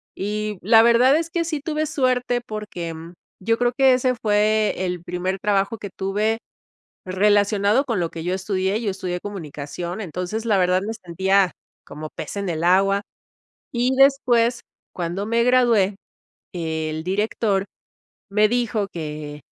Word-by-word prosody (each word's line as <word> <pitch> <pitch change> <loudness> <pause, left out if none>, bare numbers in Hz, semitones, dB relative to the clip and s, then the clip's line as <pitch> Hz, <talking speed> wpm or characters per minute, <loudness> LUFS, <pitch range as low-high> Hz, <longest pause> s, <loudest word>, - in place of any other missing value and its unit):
y 210 +1 -3
la 225 +2 +7
verdad 240 +4 +5
es 330 0 -2
que 335 0 -1
sí 310 -3 -2
tuve 310 -1 -1
suerte 250 -3 0
porque, 205 -7 -6
mm, 165 +2 -10 0.3
yo 230 +4 +1
creo 245 0 +2
que 265 -1 +6
ese 255 0 +1
fue 215 0 +2
el 180 -1 -3
primer 180 +2 -2
trabajo 200 +2 0
que 200 -1 -7
tuve 210 +4 0 0.7
relacionado 205 +5 +2
con 230 -7 -1
lo 170 -1 -1
que 165 -1 -7
yo 180 +1 -1
estudié, 190 +2 -1
yo 210 - -1
estudié 180 -2 -4
comunicación. 175 0 -6
Entonces, 180 +5 -4
la 210 -3 +3
verdad, 180 0 +2
me 220 +3 -4
sentía 190 -1 +1 0.3
como 155 +1 -8
pez - - -7
en 200 -1 -2
el 165 0 -2
agua. 195 +3 +3 0.7
Y 250 +2 +1
después, 250 -3 +4 0.3
cuando 175 +3 -3
me 230 +1 +2
gradué, 235 -6 +3 0.6
el 160 -1 -3
director 200 0 0 0.6
me 210 +1 +4
dijo 235 -4 0
que 150 -3 -6
205 Hz, 150 wpm, -22 LUFS, 180-230 Hz, 0.7 s, la